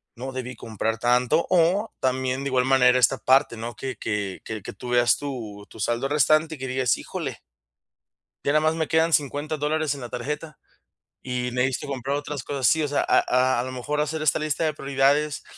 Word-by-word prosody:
no 130 +2 -6
debí 125 -1 -5
comprar 110 0 -3
tanto". 125 +7 +2
O 185 +5 +2
también, 130 0 0
de 140 - -2
igual 125 -1 +2
manera, 125 -1 +5
esta 130 +2 +4
parte, 130 -1 +3
¿no?, 115 +1 -6
que 130 -3 -4
que 100 -3 -3
que 110 -4 -6
tú 125 +5 -9
veas 120 0 +4
tu 115 -8 -6
tu - - -13
saldo 120 +5 0
restante, 155 +2 +3
que 130 - -5
digas: 130 -3 +1
"Híjole - - -6 1.0
ya 140 - +2
nada 155 - +4
más 155 +1 +2
me 160 -1 -2
quedan 160 0 +3
50 145 +2 0
dólares 150 0 0
en 140 - -9
la 120 - -7
tarjeta 150 +5 -5 0.7
y 125 -1 -2
necesito 125 +2 -1
comprar 135 0 -2
otras 145 -2 -5
cosas". 135 -3 0
Sí, 160 +5 +3
o - - 0
sea, 145 - 0
a - - +3
a 125 -1 +2
a - - 0
lo 130 - -5
mejor 140 +4 -3
hacer 155 +1 -1
esta 155 - +3
lista 155 +1 -1
de 155 -1 +1
prioridades 140 +2 +1
135 Hz, 200 wpm, -24 LUFS, 125-150 Hz, 1.0 s, manera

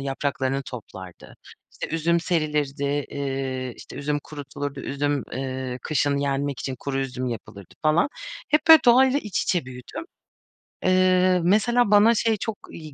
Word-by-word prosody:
yapraklarını 135 0 -2
toplardı. 95 -8 -10 0.4
İşte - - -6
üzüm 170 +1 +2
serilirdi. 150 -4 -1
Eee, 135 -2 -3
işte - - -11
üzüm 145 +1 -1
kurutulurdu. 145 -1 -6
Üzüm, 145 0 -1
eee, 130 -1 -4
kışın 145 -1 +1
yenmek 140 -1 -1
için 130 - -3
kuru 135 +1 -3
üzüm 130 -1 -3
yapılırdı 100 -5 -8
falan. 155 - +3 0.4
Hep 300 +1 +4
böyle, 320 -3 +10
doğayla 260 +3 +5
iç 210 -7 -2
içe 175 -6 0
büyüdüm. 125 - -8 0.8
Eee, 185 0 +4
mesela 220 +4 +3
bana 210 +3 +6
şey 225 -1 +1
çok 220 +1 -4
iyi 155 -3 -10
145 Hz, 140 wpm, -24 LUFS, 135-185 Hz, 0.8 s, böyle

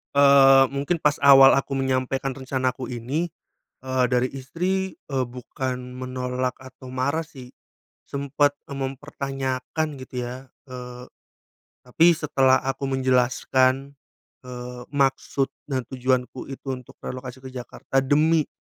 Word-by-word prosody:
Eee, 135 -1 +7
mungkin 140 +5 0
pas 150 -1 +1
awal 135 -1 +9
aku 135 0 0
menyampaikan 130 0 -1
rencanaku 130 -1 -2
ini, 130 +8 -2 0.6
eee, 130 -1 +2
dari 125 0 +2
istri, 180 +8 -2
eee, 135 -2 0
bukan 125 +1 -4 0.2
menolak 125 0 -3
atau 130 0 -12
marah 130 +5 0
sih. 130 -5 -13 0.6
Sempet 140 +1 +1
eee - - -5
mempertanyakan 135 +1 -3
gitu 125 -1 -5
ya, 130 +2 -8 0.2
eee, 125 -1 -8 0.8
tapi 165 +7 +4
setelah 135 -4 +3
aku 135 +1 -2
menjelaskan, 130 +1 +2 0.5
eee, 125 0 -7
maksud 135 -1 +1 0.2
dan 130 -2 0
tujuanku 130 0 -1
itu 135 0 -8
untuk 125 -2 -12
relokasi 130 0 -7
ke 130 - -8
Jakarta 130 +1 -4
demi 155 +3 +3
130 Hz, 120 wpm, -24 LUFS, 130-140 Hz, 0.8 s, awal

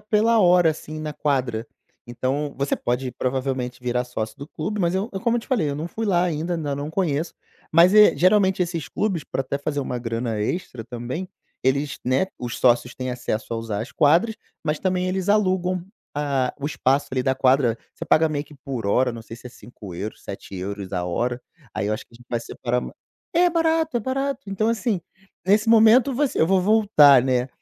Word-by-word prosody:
pela 220 +2 +2
hora, 175 -3 +5
assim, 155 0 -7
na 155 -1 -4
quadra. 130 -6 -1 0.4
Então 130 +4 -2
você 140 +1 0
pode, 125 +1 -2
provavelmente, 130 -1 -2
virar 125 0 0
sócio 110 -2 -5
do 140 - -7
clube, 200 +6 -4
mas 170 0 +1
eu 195 +5 -1
eu 195 - -4
como 235 +1 +1
eu - - -1
te - - -15
falei, 210 - +1
eu - - -3
não 160 +3 -4
fui 225 +3 -4
lá 175 -3 +3
ainda, 170 0 -1
ainda 145 -4 -2
não 145 +2 -4
conheço, 160 -3 -1 0.4
mas, 170 +4 +6
eh, 210 -8 +7
geralmente 190 +2 +3
esses 170 -4 -4
clubes, 190 -8 -1
pra - - -3
até 140 +2 -3
fazer 145 0 -2
uma 125 -2 -3
grana 115 -2 -3
extra 120 - -3
também, 125 +10 -5 0.4
eles, 140 +2 0
né, 130 +9 +2
os 120 -2 -5
sócios 125 -1 +3
têm 130 0 -4
acesso 125 -2 -3
a - - -1
usar 110 -2 -3
as 130 - -9
quadras, 175 +10 +3 0.3
mas 150 -1 0
também 185 -1 0
eles 185 +1 -2
alugam 185 -3 +1 0.3
a 140 -3 0
o - - -5
espaço 140 -2 +1
ali 130 -1 0
da 130 0 +1
quadra. 130 -3 +3 0.2
Você - - -6
paga 160 0 +4
meio 145 -1 -2
que 150 - -16
por 130 -6 -5
hora, 125 +4 +2
não 115 - -7
sei 115 +1 -10
se 125 - -12
é - - -16
€5, 105 -4 -9
€7 100 0 -6
a 90 -1 -1
hora, 120 +8 -2 0.3
aí 100 - -1
eu - - 0
acho 110 - -7
que 115 - -24
a - - -12
gente 120 0 -19
vai 120 -1 -1
separar 125 +1 -2
ma - - -7 0.4
é 355 +1 +4
barato, 320 -4 +1
é - - -5
barato. 270 0 -3
Então 195 +3 0
assim, 230 -3 0 0.5
nesse 210 +3 +3
momento, 230 +4 +6
você 285 0 0
eu 160 - +5
vou 190 0 +3
voltar, 190 - +6
né, 130 -1 +1
145 Hz, 210 wpm, -23 LUFS, 125-190 Hz, 0.5 s, eh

